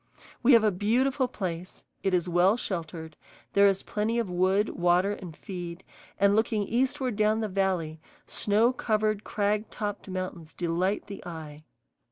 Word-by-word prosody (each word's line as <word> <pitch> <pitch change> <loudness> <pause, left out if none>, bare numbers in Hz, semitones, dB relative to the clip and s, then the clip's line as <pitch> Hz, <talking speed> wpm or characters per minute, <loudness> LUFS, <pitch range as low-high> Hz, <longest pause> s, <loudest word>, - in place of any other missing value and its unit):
We 260 +2 +6
have 230 -2 +7
a 215 - +4
beautiful 250 +8 +1
place: 185 -6 -5 0.2
it 195 - +1
is 180 -1 +1
well 180 +5 +4
sheltered; 160 -6 -5 0.4
there 200 0 +6
is 195 -1 +1
plenty 215 +3 -1
of 225 -6 -1
wood, 190 +4 +2
water, 175 +3 +2
and 180 -6 -7
feed; 175 -2 -7 0.4
and, 200 0 +4
looking 220 -1 +1
eastward 255 +2 0
down 215 +1 +2
the 215 - -1
valley, 185 -5 -1 0.3
snow 220 +4 +2
covered, 215 -3 0
crag 210 +1 -1
topped 205 -1 -5
mountains 185 -4 -5
delight 180 +3 0
the 205 -1 -9
eye. 155 -3 -8
200 Hz, 155 wpm, -28 LUFS, 175-215 Hz, 0.4 s, have